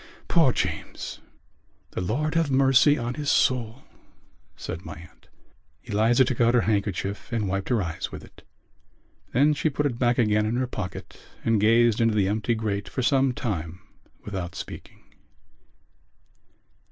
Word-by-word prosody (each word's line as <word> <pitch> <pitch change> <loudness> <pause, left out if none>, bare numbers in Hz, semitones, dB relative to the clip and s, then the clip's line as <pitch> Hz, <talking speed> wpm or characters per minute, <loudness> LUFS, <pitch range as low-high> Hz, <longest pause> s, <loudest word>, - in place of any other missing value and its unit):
Poor - - +4
James!" - - -4 0.7
"The - - -4
Lord 145 - -1
have 165 -3 +1
mercy 135 +2 +5
on 120 0 -3
his 145 +2 -3
soul!" 125 0 +1 0.7
said 85 - -6
my - - -8
aunt. 85 +3 -16 0.6
Eliza 115 +5 +3
took 125 -1 -1
out 120 +1 +4
her 120 - +5
handkerchief 100 -1 -2
and 110 -4 -1
wiped 95 0 -2
her 115 -6 +2
eyes 85 -1 -5
with - - -8
it. - - -17 0.9
Then 145 +5 +4
she 155 +2 0
put 145 +1 -1
it 125 -4 -1
back 120 -1 +2
again 105 -2 +2
in 115 - -1
her 130 +1 0
pocket 105 -6 -7 0.2
and 115 -3 +2
gazed 115 +1 +4
into 115 -1 +2
the 100 -3 +2
empty 110 +3 0
grate 100 -3 -3
for 130 - -3
some 135 0 +3
time 90 -8 -4 0.5
without 95 -4 -5
speaking. - - -9
115 Hz, 155 wpm, -25 LUFS, 100-130 Hz, 0.9 s, mercy